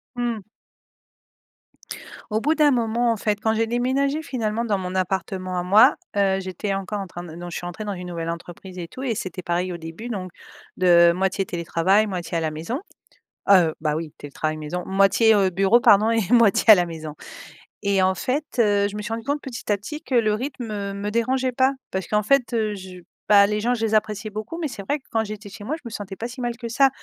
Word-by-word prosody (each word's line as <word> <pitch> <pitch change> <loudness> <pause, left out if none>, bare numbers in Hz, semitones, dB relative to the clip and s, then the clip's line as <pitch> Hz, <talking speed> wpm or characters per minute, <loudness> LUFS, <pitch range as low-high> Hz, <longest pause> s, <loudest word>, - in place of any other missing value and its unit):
Mmh. 240 -3 -2 1.9
Au 215 - +1
bout 305 +6 +1
d'un 300 -2 +4
moment, 235 0 +1
en 225 - -1
fait, 205 0 -1
quand 220 0 +2
j'ai 225 0 +1
déménagé 270 +5 0
finalement 230 -4 -2
dans 210 -4 0
mon 185 0 -5
appartement 185 0 -2
à - - -2
moi, 200 +4 +6 0.2
heu, 195 -1 +2
j'étais 190 +2 -3
encore 195 +1 -3
en - - -5
train 175 +1 -8
de 165 -1 -10
non, 175 0 -7
je - - -5
suis 175 - -5
entrée 175 +5 -6
dans 210 - -3
une 180 -2 -6
nouvelle 165 -1 -4
entreprise 175 +2 -8
et 170 - -5
tout 260 +10 -9
et 235 -5 -1
c'était 185 -1 -5
pareil 175 +1 -1
au - - -5
début. 165 +8 -8
Donc 185 -6 -5 0.5
de 170 -2 +6
moitié 190 +1 0
télétravail 175 +5 +1
moitié 175 -3 -3
à - - +1
la 160 -1 -1
maison. 165 - -4 0.7
Heu, 175 -5 +6
bah, 150 -1 +1
oui, 155 0 -4
télétravail 155 +2 -4
maison 155 +4 -5
moitié, 195 +3 +4
heu, 195 -2 +3
bureau 195 +6 +4
pardon 215 0 +5
et 225 -5 +1
moitié 230 -2 +5
à - - +11
la 180 -2 +1
maison. 160 -2 -7 0.7
Et 200 -1 +2
en 185 0 +2
fait, 275 - -1 0.2
heu, 205 -2 +3
je 205 - -7
me 210 - -4
suis 225 +1 -4
rendue 225 0 -4
compte 285 +1 -1
petit 245 -5 -5
à 205 - +3
petit 300 +10 -7
que 260 - -3
le 215 -3 +3
rythme, 245 +1 -4
heu, 200 -2 -4
me 200 +1 -3
dérangeait 255 +3 0
pas 260 +2 +3 0.2
parce 190 -1 -3
qu'en 210 0 +2
fait, 255 +2 +2
heu, 215 -2 0
je 185 -2 -10 0.3
bah, 200 -1 +7
les 210 0 -1
gens 245 +3 +1
je 225 -2 -1
les 220 0 +1
appréciais 215 0 0
beaucoup 215 +10 -6
mais 320 - -1
c'est 245 -7 -7
vrai 290 +9 -1
que - - -37
quand 225 -1 0
j'étais 215 0 -7
chez 205 +1 -10
moi 290 +8 -2
je - - -20
me - - -5
sentais 205 -3 -7
pas 230 - -4
si 245 +1 -8
mal 240 -1 -2
que 235 - -6
ça. 270 +4 +4
205 Hz, 235 wpm, -23 LUFS, 185-230 Hz, 1.9 s, à